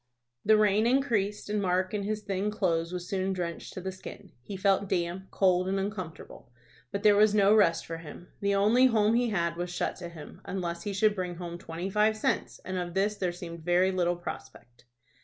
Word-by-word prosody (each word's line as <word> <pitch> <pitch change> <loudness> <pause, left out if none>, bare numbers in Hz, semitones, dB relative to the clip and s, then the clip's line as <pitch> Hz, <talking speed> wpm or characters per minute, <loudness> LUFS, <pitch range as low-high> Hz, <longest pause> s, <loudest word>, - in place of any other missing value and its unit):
The 215 +1 +5
rain 215 +1 +3
increased, 230 -6 +1
and 210 0 -1
Mark 185 0 0
in 210 - -1
his 210 +1 -3
thin 200 0 -1
clothes 170 -5 0
was 180 -1 -5
soon 190 0 -1
drenched 170 -3 -4
to 185 - -6
the 190 +1 -4
skin. 185 0 -11
He 195 +10 -7
felt 195 0 +2
damp, 180 +1 -2
cold, 185 -1 +2
and 195 +1 0
uncomfortable. 185 - -6 0.4
But 200 - -3
there 210 -1 +6
was 210 0 +5
no 200 0 +5
rest 170 -6 +3
for 165 - -5
him. 165 +2 -11
The 200 0 +1
only 220 +6 +5
home 220 -2 +3
he 240 0 +2
had 170 -5 -1
was 175 0 -3
shut 175 - -2
to 175 -1 -7
him, 160 -3 -11
unless 175 -3 -4
he 205 - -4
should 210 +2 +3
bring 180 -3 -4
home 170 0 -7
twenty 175 +2 -5
five 215 +2 +3
cents, - - -1
and 185 0 -3
of 175 0 -5
this 205 +2 +1
there 180 -3 -1
seemed 170 -2 -8
very 180 +2 +3
little 175 -1 +1
prospect. 125 -8 -9
190 Hz, 210 wpm, -29 LUFS, 175-210 Hz, 0.4 s, there